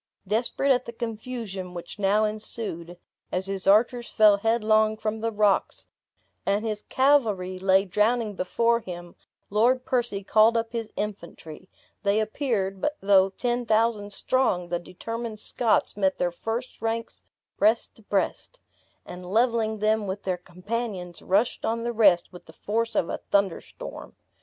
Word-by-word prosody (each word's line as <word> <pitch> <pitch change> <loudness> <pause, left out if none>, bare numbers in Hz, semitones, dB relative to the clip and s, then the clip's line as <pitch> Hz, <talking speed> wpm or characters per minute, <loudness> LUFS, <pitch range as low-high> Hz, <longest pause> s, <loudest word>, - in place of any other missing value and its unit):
Desperate 235 +7 0
at 250 -1 +2
the - - -6
confusion 225 -5 -6
which 175 +4 -8
now 205 +2 +3
ensued, 210 -5 -4 0.3
as 185 +1 -1
his 195 -1 -2
archers 235 +4 +3
fell 210 -2 +5
headlong 220 0 +2
from 220 0 -3
the 230 - 0
rocks, 210 -2 +1 0.6
and 200 +3 0
his 215 -1 -2
cavalry 215 -10 +2
lay 190 +1 +4
drowning 215 +3 +1
before 230 +5 +1
him, 175 -4 -8 0.4
Lord 245 +5 +3
Percy 240 -6 -1
called 220 +3 +4
up 225 0 -2
his 230 -2 -4
infantry; 185 -4 -7 0.3
they 205 0 +2
appeared, 215 -4 -1
but 300 0 -1
though 195 -1 +4
ten 240 +4 -2
thousand 220 -2 +1
strong, 195 -7 0
the 175 0 -1
determined 225 +5 -6
Scots 225 +1 +1
met 190 -2 +1
their 175 - 0
first 225 +8 -5
ranks 225 +1 -3 0.4
breast 220 +3 +2
to - - -17
breast; 205 - -2 0.5
and 180 +1 -9
leveling 220 +2 +1
them 215 0 +1
with 190 +2 -4
their 185 -1 0
companions, 180 0 -5
rushed 205 +6 +1
on 230 +1 -1
the 235 0 -2
rest 195 -6 +4
with 180 - -13
the - - -14
force 230 +2 -2
of 170 - +1
a - - -4
thunder 200 -3 +2
storm. - - -10
215 Hz, 150 wpm, -26 LUFS, 190-230 Hz, 0.6 s, fell